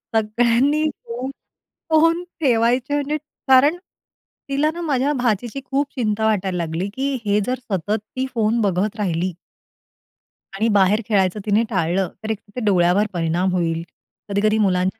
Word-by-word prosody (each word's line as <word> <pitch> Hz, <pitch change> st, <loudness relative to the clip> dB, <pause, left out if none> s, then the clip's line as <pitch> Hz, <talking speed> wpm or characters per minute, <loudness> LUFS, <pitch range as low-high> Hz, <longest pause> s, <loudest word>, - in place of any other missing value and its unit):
सगळ्यांनी 235 Hz, +7 st, +2 dB, 1.1 s
फोन 330 Hz, +2 st, +3 dB, 0.2 s
ठेवायचे 245 Hz, +1 st, +2 dB
म्हणजे 290 Hz, +1 st, -1 dB, 0.3 s
कारण 275 Hz, +6 st, +5 dB, 0.7 s
तिला 290 Hz, +3 st, +1 dB
ना, 345 Hz, -, -6 dB
माझ्या 285 Hz, -2 st, +1 dB
भाचीची 245 Hz, +1 st, -1 dB
खूप 280 Hz, +1 st, 0 dB
चिंता 220 Hz, -3 st, 0 dB
वाटायला 195 Hz, -4 st, 0 dB
लागली, 170 Hz, +3 st, -2 dB
की 275 Hz, +2 st, -1 dB
हे 205 Hz, +1 st, +2 dB
जर 255 Hz, +1 st, -2 dB
सतत 195 Hz, +4 st, 0 dB, 0.2 s
ती 260 Hz, +1 st, -1 dB
फोन 225 Hz, 0 st, +1 dB
बघत 200 Hz, +2 st, 0 dB
राहिली 180 Hz, -2 st, -1 dB, 1.2 s
आणि 215 Hz, +4 st, 0 dB
बाहेर 200 Hz, +4 st, +4 dB
खेळायचं 195 Hz, -1 st, +2 dB
तिने 210 Hz, +2 st, +3 dB
टाळलं, 185 Hz, -1 st, 0 dB
तर 220 Hz, -, -4 dB
एक 215 Hz, -, -3 dB, 0.3 s
डोळ्यावर 185 Hz, +1 st, +3 dB
परिणाम 175 Hz, +2 st, 0 dB
होईल. 165 Hz, -2 st, 0 dB, 0.5 s
कधी-कधी 215 Hz, +2 st, +2 dB
मुलांच्या 185 Hz, +3 st, 0 dB
215 Hz, 130 wpm, -21 LUFS, 190-260 Hz, 1.2 s, कारण